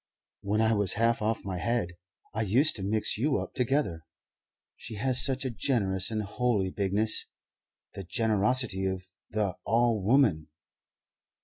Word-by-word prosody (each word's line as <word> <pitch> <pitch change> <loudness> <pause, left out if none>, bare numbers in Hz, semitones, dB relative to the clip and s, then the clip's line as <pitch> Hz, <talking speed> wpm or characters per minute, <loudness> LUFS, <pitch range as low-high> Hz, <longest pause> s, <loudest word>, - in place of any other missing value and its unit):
When 105 +2 0
I 110 0 +3
was 100 -3 +2
half 115 +1 +1
off 110 0 -1
my 95 -2 -4
head 115 -3 -1 0.4
I 110 - -2
used 120 +9 +3
to - - -6
mix 105 +2 0
you 140 +3 +1
up - - -5
together. 125 - 0 0.7
She 110 - -8
has 130 +4 +1
such 135 0 0
a 130 - -1
generous 100 -7 +1
and 110 -1 -2
holy 105 -3 -1
bigness 100 +3 0 0.7
the 100 - -7
generosity 105 0 +1
of 95 -1 -3 0.3
the 105 -3 -1
All 115 -2 +2
woman." 100 - +3
110 Hz, 145 wpm, -28 LUFS, 95-120 Hz, 0.7 s, I